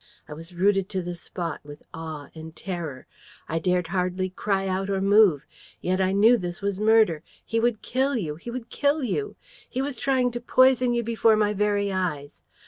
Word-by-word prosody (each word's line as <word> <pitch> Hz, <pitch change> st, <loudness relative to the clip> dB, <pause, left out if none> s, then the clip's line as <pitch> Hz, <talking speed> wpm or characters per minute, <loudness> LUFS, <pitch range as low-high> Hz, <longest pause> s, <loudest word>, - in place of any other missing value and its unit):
I -, -, -8 dB
was 165 Hz, +3 st, -11 dB
rooted 195 Hz, +1 st, +2 dB
to 190 Hz, -3 st, -2 dB
the 175 Hz, 0 st, -4 dB
spot 170 Hz, -1 st, -5 dB
with 145 Hz, 0 st, -12 dB
awe 160 Hz, -3 st, -7 dB
and 160 Hz, 0 st, -10 dB
terror. 165 Hz, -9 st, -6 dB, 0.4 s
I 165 Hz, -, -1 dB
dared 180 Hz, 0 st, 0 dB
hardly 185 Hz, 0 st, -1 dB
cry 195 Hz, 0 st, -1 dB
out 190 Hz, +1 st, -2 dB
or 195 Hz, -1 st, 0 dB
move. 195 Hz, -6 st, +4 dB, 0.3 s
Yet 185 Hz, +1 st, 0 dB
I 190 Hz, 0 st, +2 dB
knew 220 Hz, +5 st, +5 dB
this 175 Hz, -1 st, -5 dB
was 200 Hz, -1 st, -2 dB
murder. 215 Hz, -7 st, +4 dB, 0.2 s
He 230 Hz, -, -1 dB
would 235 Hz, -2 st, 0 dB
kill 270 Hz, +2 st, 0 dB
you! 160 Hz, -9 st, -3 dB
He 205 Hz, -, -9 dB
would 235 Hz, -1 st, -7 dB
kill 290 Hz, +1 st, +1 dB
you! 415 Hz, -, -2 dB, 0.3 s
He 255 Hz, -, -4 dB
was 275 Hz, 0 st, -2 dB
trying 260 Hz, -2 st, +1 dB
to 240 Hz, 0 st, -5 dB
poison 255 Hz, -1 st, +4 dB
you 235 Hz, -, 0 dB
before 225 Hz, -1 st, +3 dB
my 210 Hz, -1 st, +1 dB
very 205 Hz, 0 st, 0 dB
eyes. 150 Hz, -7 st, -3 dB
195 Hz, 195 wpm, -25 LUFS, 175-230 Hz, 0.4 s, knew